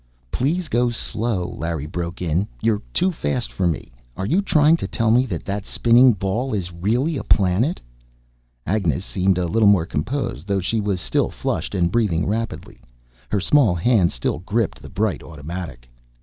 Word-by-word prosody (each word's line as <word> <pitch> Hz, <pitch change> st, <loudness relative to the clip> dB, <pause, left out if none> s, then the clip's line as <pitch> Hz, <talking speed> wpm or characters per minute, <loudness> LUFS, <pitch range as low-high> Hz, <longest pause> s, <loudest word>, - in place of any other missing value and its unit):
"Please 160 Hz, +7 st, 0 dB
go 120 Hz, -1 st, +2 dB
slow!" 110 Hz, -5 st, -2 dB
Larry 85 Hz, -3 st, -4 dB
broke 85 Hz, +2 st, -5 dB
in. 90 Hz, +4 st, 0 dB
"You're 110 Hz, -2 st, +1 dB
too 185 Hz, +2 st, +2 dB
fast 130 Hz, -7 st, -3 dB
for 90 Hz, -, 0 dB
me. 80 Hz, -7 st, -3 dB, 0.3 s
Are 95 Hz, -, -2 dB
you 175 Hz, -, +2 dB
trying 155 Hz, -4 st, +4 dB
to -, -, -4 dB
tell 115 Hz, -2 st, +1 dB
me 125 Hz, +3 st, +4 dB
that 90 Hz, -7 st, -5 dB
that 100 Hz, 0 st, -3 dB
spinning 120 Hz, +1 st, +5 dB
ball 105 Hz, +6 st, -2 dB
is 90 Hz, -3 st, -4 dB
really 120 Hz, -, 0 dB
a -, -, -4 dB
planet?" 100 Hz, -, +2 dB, 0.9 s
Agnes 100 Hz, 0 st, 0 dB
seemed 95 Hz, -1 st, +1 dB
a 90 Hz, -, 0 dB
little 105 Hz, +5 st, +4 dB
more 95 Hz, -5 st, +4 dB
composed, 100 Hz, -, -3 dB
though 100 Hz, -1 st, +1 dB
she 110 Hz, +4 st, -1 dB
was 100 Hz, -3 st, -1 dB
still -, -, 0 dB
flushed -, -, -3 dB
and 85 Hz, -2 st, +1 dB
breathing 100 Hz, -7 st, +1 dB
rapidly. 110 Hz, -, -4 dB, 0.5 s
Her 100 Hz, -, +1 dB
small 115 Hz, -3 st, +3 dB
hand 90 Hz, -1 st, +3 dB
still -, -, -2 dB
gripped 105 Hz, +5 st, -1 dB
the -, -, -10 dB
bright 105 Hz, -2 st, -1 dB
automatic. 75 Hz, -5 st, -8 dB
100 Hz, 175 wpm, -22 LUFS, 90-120 Hz, 0.9 s, spinning